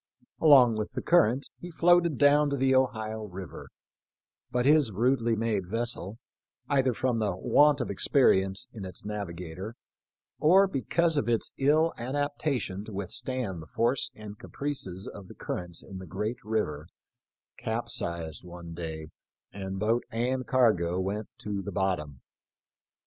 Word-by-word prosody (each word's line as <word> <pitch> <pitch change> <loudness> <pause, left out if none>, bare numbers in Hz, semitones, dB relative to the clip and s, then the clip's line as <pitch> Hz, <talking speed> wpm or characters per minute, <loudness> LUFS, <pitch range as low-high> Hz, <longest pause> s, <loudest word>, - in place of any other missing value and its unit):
Along 130 -7 +7
with 105 -1 -4
the - - -3
current 140 -6 +3
he 175 - -8
floated 170 -2 +3
down 145 0 +5
to 140 - 0
the 130 0 +3
Ohio 110 -4 0
river, 95 -2 -9 0.8
but 125 0 0
his 145 -4 +5
rudely 115 +2 +2
made 110 -4 -1
vessel, 115 -1 -3 0.5
either 130 -2 +2
from 120 0 0
the 105 -4 0
want 145 +9 +4
of - - -2
experience 95 -8 +2
in 105 - -7
its 95 +1 -8
navigator, 95 0 -6 0.6
or 190 +6 +6
because 165 +1 0
of 140 - 0
its 115 -1 0
ill 155 +4 +3
adaptation 135 -5 -2
to 110 - -9
withstand 100 0 -3
the 80 - -11
force 120 +8 0
and 105 -1 -10
caprices 105 -10 -4
of 100 -2 -9
the - - -12
currents 90 -1 -5
in 95 - -9
the 95 - -9
great 105 +9 -4
river, 85 -9 -2 0.7
capsized 85 -2 -3
one 85 -1 -9
day, 80 -2 -6 0.4
and 95 -1 -5
boat 110 +4 +1
and 125 +2 -1
cargo 105 -9 +3
went 100 +3 -2
to 100 -2 -4
the 100 - -6
bottom. 85 -8 -2
110 Hz, 145 wpm, -28 LUFS, 95-130 Hz, 0.8 s, Along